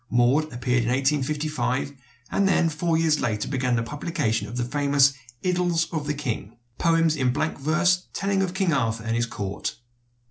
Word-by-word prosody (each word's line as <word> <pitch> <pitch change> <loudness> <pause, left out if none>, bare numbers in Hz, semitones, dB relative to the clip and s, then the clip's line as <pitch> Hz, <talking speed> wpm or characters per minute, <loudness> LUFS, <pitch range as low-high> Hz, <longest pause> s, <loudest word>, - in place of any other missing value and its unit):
"Maud" 125 +6 +3
appeared 125 0 0
in 115 - -1
1855, 140 0 0 0.4
and 200 - +2
then 175 -3 +3
four 160 +1 0
years 160 -2 +2
later 110 -3 -1
began 125 -3 0
the 115 - 0
publication 145 - -2
of 120 +4 -7
the 120 - 0
famous 140 +1 +3 0.3
"Idylls 175 -2 +1
of 150 -2 -2
the 150 - -1
King," 120 -5 -4 0.2
poems 165 -2 +3
in 130 -4 +1
blank 155 +4 -2
verse 180 +5 +2
telling 195 0 0
of 185 -1 -2
King 190 -4 +1
Arthur 115 -5 0
and 115 0 -1
his 120 0 0
court. 100 -5 -4
145 Hz, 175 wpm, -25 LUFS, 120-165 Hz, 0.4 s, Maud